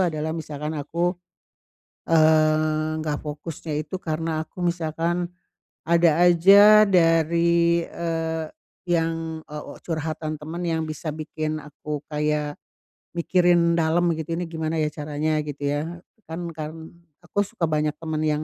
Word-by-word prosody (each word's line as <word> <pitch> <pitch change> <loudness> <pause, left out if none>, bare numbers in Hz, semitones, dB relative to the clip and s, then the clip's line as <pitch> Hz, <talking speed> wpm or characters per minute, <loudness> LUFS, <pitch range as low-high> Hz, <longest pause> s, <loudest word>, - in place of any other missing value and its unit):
adalah 160 -3 0
misalkan 150 -1 -5
aku, 170 +5 -1 1.0
eee, 155 -1 +3
nggak 150 -2 -2
fokusnya 150 0 -5
itu 150 +5 -7
karena 160 -1 -2
aku - - -14
misalkan, 170 0 -1 0.6
ada 170 -1 +4
aja 200 +5 +8
dari, 170 -1 +3
eee, 165 -1 -3 0.4
yang, 165 -2 -1
eee, 150 0 -7
o, - - -9
curhatan 155 -1 -3
teman 160 +4 -6
yang 165 -2 0
bisa 155 +1 -4
bikin 155 0 -4
aku 150 0 -6
kayak 150 0 -1 0.6
mikirin 175 -1 +3
dalam, 170 +2 +2
gitu, 160 +1 -4
"Ini 175 - -2
gimana, 160 0 -2
ya, 150 - +1
caranya," 150 +1 -1
gitu, 145 -1 -7
ya. 160 +4 -3 0.3
Kan 170 +1 -4
karen 160 +1 -7 0.3
aku 180 +3 -1
suka 195 -4 -2
banyak 150 -1 +1
teman 160 -1 -2
yang 150 0 0
160 Hz, 130 wpm, -24 LUFS, 155-170 Hz, 1.0 s, aja